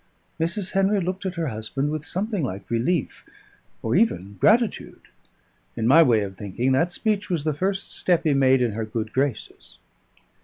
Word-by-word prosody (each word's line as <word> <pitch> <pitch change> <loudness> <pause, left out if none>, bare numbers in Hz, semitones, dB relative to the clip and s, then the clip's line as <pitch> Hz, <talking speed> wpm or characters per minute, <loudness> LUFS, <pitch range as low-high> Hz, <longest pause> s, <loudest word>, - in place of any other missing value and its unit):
Mrs. 170 +4 -2
Henry 195 +1 +2
looked 190 +2 -3
at 185 - -4
her 165 -4 -2
husband 125 +6 -3
with 155 -1 -3
something 195 +5 -2
like 100 -4 -5
relief, 125 +6 -1 0.6
or 115 - 0
even 100 - +1
gratitude. 230 +1 +2 0.7
In 115 - -2
my 150 +6 +7
way 120 -8 +4
of 95 -1 -6
thinking, 105 +7 -2
that 165 +7 +2
speech 205 +1 -1
was 170 -5 -1
the 155 0 0
first 190 +5 -2
step 175 -2 +1
he 155 - +2
made 130 -2 +4
in 120 - 0
her 110 +2 -3
good 110 0 -4
graces. 135 -4 -3
150 Hz, 175 wpm, -24 LUFS, 115-185 Hz, 0.7 s, my